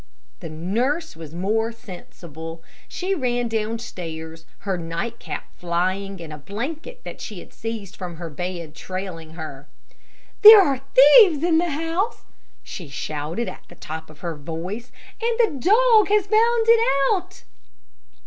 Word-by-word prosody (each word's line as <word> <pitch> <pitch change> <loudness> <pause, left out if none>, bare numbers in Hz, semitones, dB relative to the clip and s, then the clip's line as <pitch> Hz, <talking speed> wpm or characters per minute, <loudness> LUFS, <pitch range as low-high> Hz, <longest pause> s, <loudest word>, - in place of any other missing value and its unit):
The 165 - -7
nurse 235 - -1
was 160 -1 -10
more 220 +5 0
sensible. 170 -7 -10 0.2
She 375 +2 -2
ran 245 -7 0
downstairs, 180 -8 -5
her 195 -2 -1
night 170 +7 -4
cap - - -7
flying, 185 +3 -1
and 155 -2 -8
a 150 - -8
blanket 300 - -6
that - - -8
she 210 - -7
had - - -11
seized 220 -3 -6
from 180 -2 -6
her 165 0 -7
bed, 170 0 -5
trailing 185 -2 -6
behind 160 0 -7
her. 135 +1 -14 0.7
"There 425 0 +12
are 275 -9 +2
thieves 295 - +8
in 335 -2 +4
the 345 0 0
house," 330 +9 -2 0.4
she 175 - -8
shouted 150 - -4
at - - -8
the 175 - -14
top 160 -1 -7
of 155 -1 -16
her 170 -2 -3
voice, 170 - -6 0.3
"and 460 0 0
the 385 - +2
dog 445 -1 +6
has 415 -1 +3
found 450 +2 +3
it 460 0 +6 0.3
out." 375 - -5
200 Hz, 150 wpm, -23 LUFS, -, 0.7 s, There